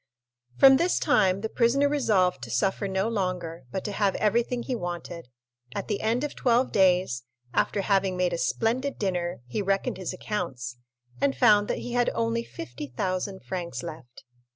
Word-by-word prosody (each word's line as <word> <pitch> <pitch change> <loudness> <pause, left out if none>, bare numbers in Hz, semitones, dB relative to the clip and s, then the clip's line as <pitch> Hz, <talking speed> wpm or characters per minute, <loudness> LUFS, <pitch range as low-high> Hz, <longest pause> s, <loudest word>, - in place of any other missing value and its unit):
From 270 -1 +8
this 345 +5 +2
time 195 -10 +3
the 220 - -1
prisoner 245 +5 +2
resolved 200 - +2
to 115 - -7
suffer 190 - 0
no 190 +2 0
longer, 180 - -3
but 190 - -4
to 210 - -2
have 200 -1 +1
everything 235 +3 +1
he 260 - -3
wanted. 175 - -5 0.5
At - - -4
the 205 - -1
end 230 +5 +1
of 295 - -3
twelve 245 +1 +2
days, 180 - +3 0.3
after 200 - +1
having 195 -2 +1
made 180 -1 +1
a 170 - -2
splendid 255 +9 0
dinner, 180 - -2
he 125 +12 -3
reckoned 195 -1 0
his 185 -2 -4
accounts, 140 - -4 0.4
and 135 -2 +1
found 205 - +5
that - - -1
he 245 - -6
had 245 0 +2
only 230 0 0
50,000 180 - -4
francs 170 -9 -4
left. 130 -5 -9
190 Hz, 170 wpm, -27 LUFS, 175-230 Hz, 0.5 s, From